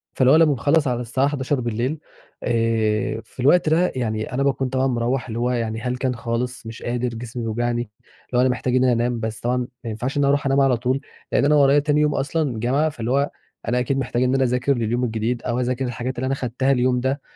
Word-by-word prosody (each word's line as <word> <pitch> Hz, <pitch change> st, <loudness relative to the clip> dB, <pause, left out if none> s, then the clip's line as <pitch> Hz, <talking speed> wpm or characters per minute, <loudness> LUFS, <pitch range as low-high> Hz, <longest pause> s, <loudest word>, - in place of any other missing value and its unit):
فاللي 130 Hz, 0 st, +4 dB
هو -, -, +7 dB
أنا 160 Hz, 0 st, +6 dB
باخلّص 145 Hz, +2 st, +2 dB
على 120 Hz, -1 st, -1 dB
الساعة 130 Hz, +3 st, 0 dB
23:00 130 Hz, -1 st, -1 dB, 0.4 s
آآ، 115 Hz, -2 st, 0 dB
في 125 Hz, -, -23 dB
الوقت 155 Hz, +6 st, +4 dB
ده 170 Hz, +3 st, +3 dB
يعني 110 Hz, -2 st, -2 dB
أنا 135 Hz, +2 st, 0 dB
باكون 135 Hz, -1 st, 0 dB
طبعًا 130 Hz, +1 st, +1 dB
مروّح 120 Hz, +1 st, -1 dB
اللي 115 Hz, 0 st, -4 dB
هو 125 Hz, +1 st, +1 dB
يعني 115 Hz, -2 st, -2 dB
هلكان 125 Hz, 0 st, -1 dB
خالص، 120 Hz, +1 st, -3 dB
مش 115 Hz, -, -8 dB
قادر، 125 Hz, +1 st, -1 dB
جسمي 120 Hz, +1 st, -6 dB
بيوجعني، 120 Hz, +2 st, -1 dB, 0.5 s
اللي 125 Hz, -, -1 dB
هو -, -, +5 dB
أنا 130 Hz, -, +3 dB
محتاج 125 Hz, 0 st, -1 dB
إن 130 Hz, -, +3 dB
أنا 125 Hz, -1 st, +4 dB
أنام، 120 Hz, 0 st, 0 dB
بس 110 Hz, -1 st, -4 dB
طبعًا 125 Hz, +1 st, 0 dB
ما 125 Hz, -1 st, -6 dB
ينفعش 125 Hz, +6 st, -3 dB
إن -, -, +2 dB
أنا 140 Hz, -, +3 dB
أرُوح 145 Hz, 0 st, +1 dB
أنام 135 Hz, 0 st, +3 dB
على 135 Hz, -3 st, +3 dB
طول، 130 Hz, +3 st, -1 dB, 0.3 s
لأن -, -, +3 dB
أنا 150 Hz, -, +4 dB
ورايا 140 Hz, 0 st, +5 dB
تاني 150 Hz, 0 st, +1 dB
يوم 150 Hz, -1 st, +2 dB
أصلًا 135 Hz, -3 st, -1 dB
جامعة، 135 Hz, +7 st, +1 dB
فاللي 120 Hz, -5 st, -4 dB
هو 140 Hz, +2 st, +1 dB, 0.4 s
أنا 125 Hz, +1 st, +1 dB
أكيد 130 Hz, +2 st, 0 dB
محتاج 125 Hz, -1 st, -1 dB
إن 130 Hz, +1 st, +2 dB
أنا 135 Hz, -, +3 dB
أذاكر 125 Hz, +2 st, +1 dB
لليوم 120 Hz, +2 st, 0 dB
الجديد، 115 Hz, +1 st, -1 dB
أو 120 Hz, 0 st, -1 dB
أذاكر 125 Hz, +1 st, -1 dB
الحاجات 125 Hz, +1 st, -4 dB
اللي 125 Hz, -, -2 dB
أنا 135 Hz, -, 0 dB
خدتها 130 Hz, +1 st, -1 dB
اليوم 125 Hz, -1 st, +2 dB
ده، 135 Hz, +3 st, -1 dB
125 Hz, 230 wpm, -22 LUFS, 120-135 Hz, 0.5 s, هو